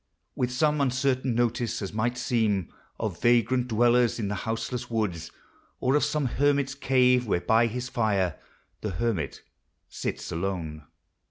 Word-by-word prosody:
With 125 -1 -1
some 150 +3 +2
uncertain 130 -1 +1
notice, 120 0 0
as 100 -1 -5
might 120 +3 -1
seem 110 -7 0 0.3
Of - - -3
vagrant 120 +1 +3
dwellers 120 +1 +3
in 105 -4 -2
the - - -1
houseless 115 +4 -3
woods, 100 -8 -2 0.5
Or 130 - +1
of 150 - +3
some 150 -2 0
hermit's 140 +1 +1
cave, 125 -3 +3
where 95 - +1
by 115 +5 +3
his 125 +2 -4
fire 100 -8 0 0.4
The 105 - -2
hermit 90 - -2 0.5
sits - - -4
alone. 80 -4 -4
120 Hz, 145 wpm, -27 LUFS, 105-125 Hz, 0.5 s, vagrant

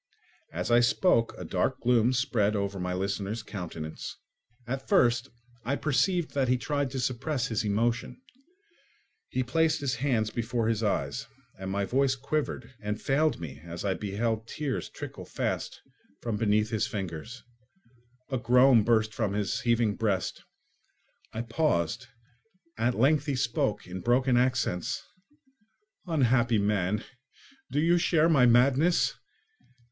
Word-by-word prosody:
As 90 +7 -3
I 120 - +6
spoke, 120 -1 +2
a - - -7
dark - - -1
gloom 120 0 +3
spread 115 -5 +1
over 100 -1 -2
my 90 0 -2
listener's 100 +4 -2
countenance. 85 -7 -6 0.5
At 135 +2 -5
first 120 - +3 0.3
I 135 +4 0
perceived 165 +4 +1
that 135 -2 +1
he 125 +1 +3
tried 145 +1 -1
to 130 +1 -4
suppress 130 +2 -1
his 110 -2 -1
emotion; 115 - -1 1.1
he 130 - -1
placed 160 +5 +1
his 140 -3 -1
hands 115 -5 0
before 115 -1 -1
his 115 -1 0
eyes, 105 -3 -1 0.3
and 95 0 -5
my 100 +1 -1
voice 135 +4 +2
quivered 145 +1 -3
and 105 0 -3
failed 150 - +1
me 70 -5 -8
as 85 +3 -6
I 95 - +2
beheld 110 +3 -2
tears 145 -1 -3
trickle - - -8
fast - - -3 0.4
from 115 -2 -3
between 105 0 +2
his 110 -1 -1
fingers; 100 +4 -6 0.9
a 130 - 0
groan 125 -1 +5
burst 110 -1 +2
from 105 -3 -1
his 105 +3 -1
heaving 115 -4 +2
breast. 100 -5 -1 0.9
I 115 - -4
paused; 115 - 0 0.7
at 120 +2 0
length 145 +5 +3
he 140 - 0
spoke, 115 -4 -1
in 90 +1 -7
broken 125 +3 +2
accents: 125 -3 0 1.0
"Unhappy 120 -7 +3
man! 100 0 0 0.7
Do 145 - +1
you 170 +3 +4
share 165 -1 +3
my 135 -6 +5
madness? 135 +8 +4
120 Hz, 140 wpm, -28 LUFS, 105-135 Hz, 1.1 s, I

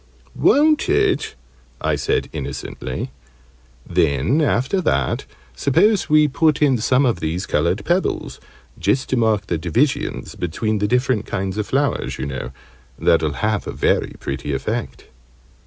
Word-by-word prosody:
"Won't 305 +1 +3
it?" - - +1 0.4
I - - 0
said, - - 0
innocently. - - -5 0.8
"Then, 75 - +2
after 145 +6 +1
that, 70 - 0 0.3
suppose 200 - +2
we 150 0 +5
put 150 +1 +2
in 135 -5 +3
some 130 +5 +3
of 115 -8 +1
these 85 +3 -2
coloured 85 +7 0
pebbles 180 +2 -1 0.4
just 130 - 0
to - - +1
mark 110 -4 +1
the 85 -4 -2
divisions 120 - -1
between 105 +5 -2
the 105 - +1
different 125 -2 +1
kinds 95 0 -3
of 105 - -2
flowers, 140 +1 0
you - - -3
know. 65 -2 -5 0.5
That'll 80 -3 +2
have 110 -1 -1
a - - -3
very - - 0
pretty 70 +1 -4
effect." 65 - -4
110 Hz, 140 wpm, -20 LUFS, 85-140 Hz, 0.8 s, we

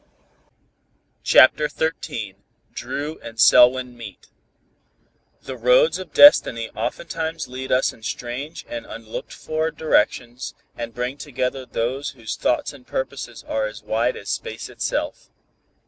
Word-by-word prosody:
CHAPTER 150 +3 +6
XIII 115 -11 -3 0.4
DRU 150 +3 -5
AND 115 0 -10
SELWYN 125 +1 +6
MEET 110 -5 -11 1.1
The 130 - -6
roads 125 +8 +4
of 185 - -8
destiny 115 - +6
oftentimes 160 +5 -4
lead 130 +1 -6
us 130 - +2
in - - -18
strange 125 +8 -5
and 295 0 -6
unlooked - - -7
for 155 +1 -2
directions 125 -5 0 0.2
and 115 -1 -6
bring 125 +3 -3
together 130 -1 -3
those 130 +5 -2
whose 110 -2 -5
thoughts 125 - 0
and 130 -3 -16
purposes 130 -3 -5
are 110 -1 0
as 105 0 -10
wide 115 +3 0
as 100 - -9
space - - -5
itself. - - -3
130 Hz, 125 wpm, -22 LUFS, 120-155 Hz, 1.1 s, CHAPTER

